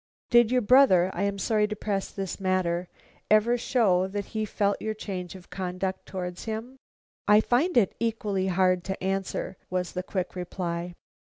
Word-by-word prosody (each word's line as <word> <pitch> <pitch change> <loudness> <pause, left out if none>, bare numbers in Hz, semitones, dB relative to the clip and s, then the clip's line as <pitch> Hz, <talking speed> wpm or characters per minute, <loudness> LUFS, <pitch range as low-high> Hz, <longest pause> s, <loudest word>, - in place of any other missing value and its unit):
"Did 240 -2 +6
your 250 -1 +2
brother 205 -7 +6
I 175 - -3
am 200 0 -1
sorry 210 +2 +1
to 215 - -4
press 200 -2 -2
this 195 -1 -5
matter 185 -2 0 0.4
ever 215 +3 +4
show 215 -7 +2
that 200 +1 -4
he 215 -1 -1
felt 205 -1 0
your 220 0 -2
change 185 -4 -6
of 180 -2 -14
conduct 185 0 -3
towards 180 -2 -5
him?" 225 +4 -5 0.5
"I 210 +1 +7
find 250 +9 +2
it 205 -6 +4
equally 215 -5 -1
hard 185 -1 +2
to 190 -1 -4
answer," 195 -1 -2
was 180 -1 -2
the 180 - -3
quick 185 0 -4
reply. 175 -1 -4
195 Hz, 170 wpm, -27 LUFS, 185-215 Hz, 0.5 s, I